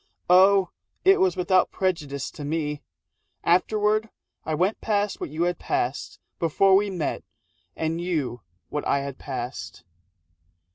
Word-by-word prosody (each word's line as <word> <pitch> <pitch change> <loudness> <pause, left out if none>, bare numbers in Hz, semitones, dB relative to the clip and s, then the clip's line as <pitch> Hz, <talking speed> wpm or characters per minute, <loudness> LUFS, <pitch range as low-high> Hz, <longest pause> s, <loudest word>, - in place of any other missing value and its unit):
(Oh, 190 0 +6 0.3
it 385 0 +6
was 375 -1 +2
without 185 0 +3
prejudice 150 -7 -2
to 150 - -9
me!) 150 -1 -2 0.6
Afterward 215 +4 +2 0.4
I 155 - 0
went 185 +7 0
past 205 -1 0
what - - -3
you 155 +4 -2
had 175 -1 0
passed 125 +4 -2 0.2
Before 190 +4 +4
we 205 +1 +3
met 175 -6 -3 0.5
and 160 +1 -2
you 150 -9 -2 0.3
what 150 - -3
I 140 - +2
had 140 -1 -6
passed. 130 -2 -6
175 Hz, 135 wpm, -25 LUFS, 150-195 Hz, 0.6 s, Oh